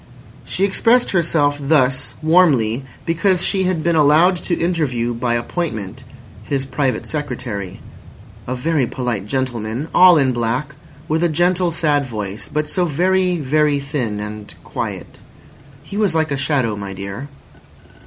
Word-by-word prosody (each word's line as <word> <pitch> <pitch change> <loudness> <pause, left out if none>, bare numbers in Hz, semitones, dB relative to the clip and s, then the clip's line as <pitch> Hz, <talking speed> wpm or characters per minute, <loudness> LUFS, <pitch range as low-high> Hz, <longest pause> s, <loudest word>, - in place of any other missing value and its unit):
She 195 - 0
expressed 235 +5 +3
herself 155 -5 +1
thus 130 -5 +1
warmly 145 -9 +3 0.2
because 175 +2 +1
she 190 -1 +1
had 180 -4 0
been 170 -1 +2
allowed 155 +5 +5
to 175 0 -2
interview 140 -9 0
by 120 0 -1
appointment 120 - -4 0.4
his 135 +3 -2
Private 135 -1 -1
Secretary—"a 125 - -7
very 145 0 0
polite 120 -6 -3
gentleman, 125 +2 -3
all 180 -2 +7
in 135 -3 +3
black, 120 +4 -2 0.3
with 160 +1 0
a 175 - +2
gentle, 175 +2 +1
sad 150 -3 +1
voice, 105 -3 -6
but 150 0 -1
so 180 +4 +1
very, 180 +3 +1
very 150 0 +2
thin 135 -7 -3
and 105 0 -7
quiet. - - -6 0.6
He 200 +7 -7
was 205 -6 +1
like 160 -1 +1
a - - +1
shadow, 135 -6 0
my 100 -1 -6
dear." 100 +7 -6
145 Hz, 140 wpm, -19 LUFS, 120-170 Hz, 0.6 s, all